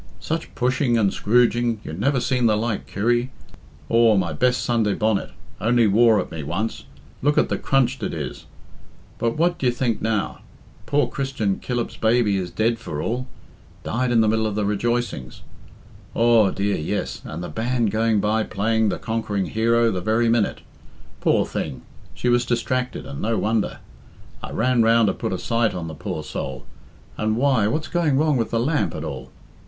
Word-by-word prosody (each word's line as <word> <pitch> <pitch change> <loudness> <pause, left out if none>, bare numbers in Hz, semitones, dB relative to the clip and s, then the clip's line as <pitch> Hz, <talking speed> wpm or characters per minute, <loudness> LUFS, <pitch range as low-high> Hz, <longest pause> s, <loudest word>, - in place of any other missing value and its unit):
"Such 160 +1 -4
pushing 125 -1 +1
and 100 -4 +2
scrooging, 120 +1 +2
you 75 - -7
never 130 - +1
seen 125 -1 +1
the 105 -1 +3
like, 110 -1 -2
Kirry. 120 +5 0 0.6
Aw, 115 -1 +4
my 90 -3 0
best 125 0 +1
Sunday 115 -4 +1
bonnet, 110 -2 0 0.3
only 120 +1 +3
wore 110 +1 +5
at 90 - -4
me 80 -2 -5
once, 90 +10 -3 0.4
look 145 +2 +2
at - - +3
the - - 0
crunched 130 -1 +1
it - - -2
is! - - -6 0.7
But 115 +3 0
what 175 +2 +1
d'ye 130 - +2
think 120 -2 -1
now? 110 -2 -1 0.5
Poor 145 0 +2
Christian 130 -8 -2
Killip's 120 -2 -3
baby 110 -2 +2
is 90 -2 -3
dead 110 +6 0
for 75 -10 -5
all. 125 - -2 0.6
Died 125 +2 -1
in 115 -2 +4
the 110 - +3
middle 110 0 +1
of 105 - -3
the 105 -1 0
rejoicings. 105 - -2 0.7
Aw, 115 -3 +5
dear, 100 +1 -1
yes, 75 - -3
and 80 +3 -6
the - - -4
band 115 +4 0
going 110 0 +2
by 110 +2 +1
playing 110 +1 +1
'The - - -2
Conquering 110 -4 -2
Hero' 115 +1 +3
the 90 -3 -3
very 110 +3 +2
minute. 115 -2 +1 0.6
Poor - - +2
thing! - - -5 0.3
she - - -3
was 120 0 +3
distracted, 125 +1 -2
and 70 - -7
no 115 +1 0
wonder. 110 0 0 0.6
I - - -6
ran 125 0 +2
round 115 -1 +4
to - - 0
put - - -4
a 95 - -1
sight 115 0 0
on 85 -2 -4
the 80 - -6
poor 75 - -5
soul, 65 0 -5 0.5
and 110 +1 0
why, 130 -5 +3
what's 155 +8 -1
going 165 -6 +1
wrong 150 0 +2
with 115 -3 0
the 115 - 0
lamp, 145 +6 0
at - - -5
all? - - -6
115 Hz, 180 wpm, -23 LUFS, 105-120 Hz, 0.7 s, wore